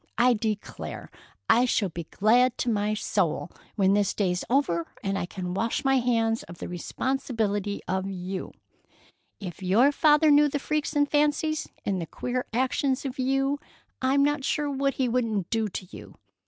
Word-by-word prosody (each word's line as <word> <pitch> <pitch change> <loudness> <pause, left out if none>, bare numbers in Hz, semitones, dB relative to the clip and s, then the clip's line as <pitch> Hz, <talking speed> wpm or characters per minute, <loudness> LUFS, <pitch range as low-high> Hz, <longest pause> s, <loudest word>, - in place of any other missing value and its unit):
I 245 +1 +5
declare 215 -2 -4 0.4
I 245 +2 +5
shall 210 -5 +1
be 170 0 -6
glad 240 +8 +3
to 245 - 0
my 210 0 0
soul - - -1 0.2
when 195 -2 +3
this 205 -1 +1
day's 180 -3 0
over 200 - +1 0.2
and 195 0 -1
I 175 - -2
can 180 -1 -5
wash 230 +8 -1
my 270 0 +4
hands 230 -2 +1
of 170 0 -11
the - - -6
responsibility 205 +1 -2
of 190 +1 -1
you. 185 0 -5 0.9
If 185 -2 -7
your 215 +10 +4
father 300 +1 +4
knew 295 0 +6
the 290 - -1
freaks 300 +1 -2
and 290 0 +3
fancies 300 +1 +1 0.2
and 190 -3 -1
the 165 - -5
queer 250 +7 -3
actions 260 +3 0
of 270 0 -5
you 270 +2 +1 0.4
I'm 270 +2 +3
not 290 0 +1
sure 290 +1 0
what 275 0 0
he 260 - +1
wouldn't 225 -6 -1
do 225 -1 +1
to 185 - -6
you! - - -12
235 Hz, 170 wpm, -26 LUFS, 195-275 Hz, 0.9 s, knew